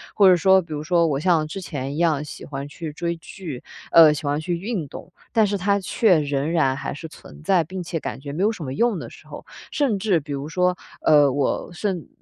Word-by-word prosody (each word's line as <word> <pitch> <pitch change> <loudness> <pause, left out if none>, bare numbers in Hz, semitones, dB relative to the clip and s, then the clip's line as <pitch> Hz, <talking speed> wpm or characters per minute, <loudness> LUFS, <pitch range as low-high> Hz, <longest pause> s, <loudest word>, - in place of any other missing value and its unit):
或 200 -2 +6
者 185 - +7
说 190 +2 +4
比 160 -2 -8
如 150 - -3
说 170 0 +2
我 145 -4 0
像 160 -2 +2
之 185 +5 -6
前 140 -5 -5
一 - - -5
样 155 -3 +1
喜 - - -9
欢 140 0 -6
去 155 +2 -7
追 170 +3 -3
剧， 165 -6 -8 0.3
呃 160 -2 +8
喜 150 - -6
欢 145 +1 0
去 170 +1 -2
运 190 -5 -3
动， - - -11 0.2
但 220 -2 +4
是 200 -1 -1
它 200 +2 +2
却 190 -1 +3
仍 145 +1 -1
然 135 -6 +2
还 135 - -4
是 160 +2 -7
存 155 - -14
在， 185 -1 +3
并 180 +3 -6
且 165 -1 -3
感 - - -5
觉 140 +1 -7
没 170 - -3
有 210 +3 +3
什 185 - -7
么 130 - -4
用 235 +3 +1
的 - - -8
时 - - -16
候。 - - -10 0.3
甚 250 -9 0
至 195 -4 +2
比 145 -1 -10
如 140 +2 -4
说， 180 +1 +1 0.3
呃， 145 -3 +5
我 140 0 -1
甚 180 -2 -3
165 Hz, 260 characters per minute, -23 LUFS, 145-190 Hz, 0.3 s, 呃